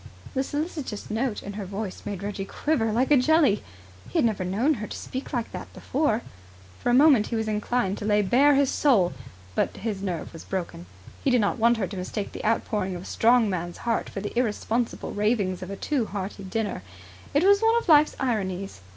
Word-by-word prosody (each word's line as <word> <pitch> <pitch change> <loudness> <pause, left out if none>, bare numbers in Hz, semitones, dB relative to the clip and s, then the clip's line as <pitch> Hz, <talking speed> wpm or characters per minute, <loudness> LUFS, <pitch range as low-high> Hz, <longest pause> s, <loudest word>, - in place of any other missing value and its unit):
The 265 - +1
solicitous 290 - -4
note 225 0 -1
in 200 - -6
her 205 0 -5
voice 195 0 -5
made 200 -2 -4
Reggie 200 -1 -3
quiver 225 +2 0
like 250 +6 +1
a 290 - +7
jelly. 285 -5 +3 0.5
He - - -2
had - - +4
never 215 -4 0
known 215 +12 +1
her 210 - -5
speak 260 +1 -6
like 240 -4 -2
that - - -7
before. 260 -6 0 0.6
For - - -1
a - - +3
moment 270 -6 +6
he 235 - -3
was 220 -1 -1
inclined 210 -1 0
to 210 - -5
lay 210 -1 +3
bare 275 +8 +5
his 275 -1 +3
soul; 210 - +3 0.4
but - - 0
his 210 -3 -3
nerve 180 -5 -4
was 165 - -9
broken. 170 - -5 0.4
He - - +2
did 250 -1 +4
not 210 +3 0
want 235 +1 +4
her 210 - 0
to 190 +2 -7
mistake 195 +3 -4
the - - -7
outpouring 210 -3 0
of 175 - -7
a - - -12
strong 235 0 +4
man's 175 -3 -3
heart 230 -1 0
for 195 - -5
the 205 - -5
irresponsible 235 0 -1
ravings 205 -3 0
of 185 - -6
a 200 - -4
too 255 +1 -1
hearty 195 0 -5
diner. 215 - -2 0.5
It 290 - +4
was 400 +1 +6
one 450 +1 +4
of 470 - -2
Life's 305 -2 +6
ironies. 195 - -2
220 Hz, 210 wpm, -26 LUFS, 195-255 Hz, 0.6 s, a